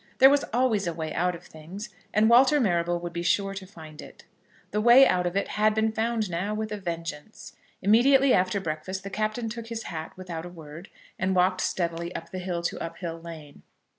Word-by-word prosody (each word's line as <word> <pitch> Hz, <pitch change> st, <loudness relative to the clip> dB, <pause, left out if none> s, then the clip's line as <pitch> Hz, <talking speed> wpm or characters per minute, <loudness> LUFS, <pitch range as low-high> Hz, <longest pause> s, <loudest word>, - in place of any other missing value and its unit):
There 270 Hz, +1 st, +8 dB
was 285 Hz, 0 st, +3 dB
always 225 Hz, -5 st, +1 dB
a 170 Hz, -, -2 dB
way 160 Hz, -1 st, -4 dB
out 180 Hz, +1 st, 0 dB
of 170 Hz, -, -12 dB
things, 175 Hz, +8 st, -9 dB, 0.2 s
and 215 Hz, +1 st, +3 dB
Walter 260 Hz, +5 st, +6 dB
Marrable 175 Hz, -6 st, +1 dB
would 175 Hz, 0 st, -6 dB
be 170 Hz, -, -3 dB
sure 195 Hz, +3 st, +1 dB
to 190 Hz, -1 st, -8 dB
find 155 Hz, -5 st, -12 dB
it. -, -, -14 dB, 0.5 s
The 210 Hz, -, 0 dB
way 240 Hz, +4 st, +8 dB
out 180 Hz, -1 st, +1 dB
of 175 Hz, +2 st, -2 dB
it 200 Hz, -, -1 dB
had 215 Hz, 0 st, +2 dB
been 220 Hz, 0 st, +1 dB
found 220 Hz, 0 st, -1 dB
now 185 Hz, +4 st, -2 dB
with 215 Hz, 0 st, -4 dB
a 210 Hz, -, -3 dB
vengeance. 170 Hz, 0 st, -7 dB, 0.3 s
Immediately 260 Hz, +6 st, +5 dB
after 185 Hz, +2 st, +2 dB
breakfast 185 Hz, +2 st, -4 dB
the 195 Hz, -, -7 dB
Captain 215 Hz, +3 st, -2 dB
took 230 Hz, +1 st, -6 dB
his 230 Hz, -1 st, -5 dB
hat 160 Hz, -1 st, -6 dB
without 175 Hz, -3 st, -6 dB
a 175 Hz, -, -8 dB
word, 165 Hz, 0 st, -11 dB, 0.3 s
and 190 Hz, 0 st, 0 dB
walked 180 Hz, +1 st, +2 dB
steadily 170 Hz, -1 st, -2 dB
up -, -, -7 dB
the 185 Hz, -, -5 dB
hill 180 Hz, -2 st, -3 dB
to -, -, -2 dB
Uphill 165 Hz, 0 st, -6 dB
Lane. 160 Hz, -4 st, -11 dB
190 Hz, 210 wpm, -26 LUFS, 170-220 Hz, 0.5 s, There